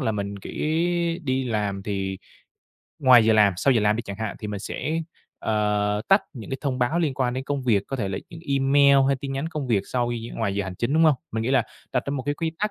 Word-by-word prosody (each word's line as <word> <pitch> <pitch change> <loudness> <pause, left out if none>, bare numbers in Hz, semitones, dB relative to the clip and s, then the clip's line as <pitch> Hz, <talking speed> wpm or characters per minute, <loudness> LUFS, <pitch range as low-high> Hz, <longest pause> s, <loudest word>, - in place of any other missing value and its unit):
là 110 - 0
mình 100 -1 -3
chỉ - - -7 0.7
đi 130 0 0
làm 105 -4 -2
thì 95 -2 -3 0.8
ngoài 125 -4 +7
giờ 110 - +4
làm, 105 -3 +5
sau 135 +8 +3
giờ 115 - +3
làm 105 +1 +2
đi 115 - -3
chẳng 100 - -7
hạn 110 -2 -4
thì 105 - -6
mình 105 -1 -4
sẽ, 155 +9 -3 0.4
ờ, 105 -1 0
tắt 195 +2 +5
những 120 -8 -9
cái 135 - -2
thông 135 -3 -2
báo 125 +7 +1
liên 155 -6 0
quan 130 -3 0
đến 130 +1 -3
công 140 -1 -2
việc, 110 -6 +2
có 135 - -4
thể 105 -5 -2
là 95 - -3
e 165 - -11
email 140 0 +4
hay 140 - +2
tin 140 -2 -4
nhắn 135 +4 -2
công 150 -5 -4
việc 105 -5 +2
sau 120 -1 -1
gi 115 -1 -5
ngoài 105 -4 -1
giờ 100 0 -1
hành 95 -1 -6
chính, 120 +8 -2
đúng 160 - +4
hông? 155 -2 +6 0.2
Mình 110 0 -1
nghĩ 120 - -1
là 135 - +4 0.3
đặt 125 - +1
ra - - -2
một 140 -2 -2
cái 145 +2 -1
quy 165 +2 -2
tắc 210 +1 0
120 Hz, 265 wpm, -24 LUFS, 105-140 Hz, 0.8 s, ngoài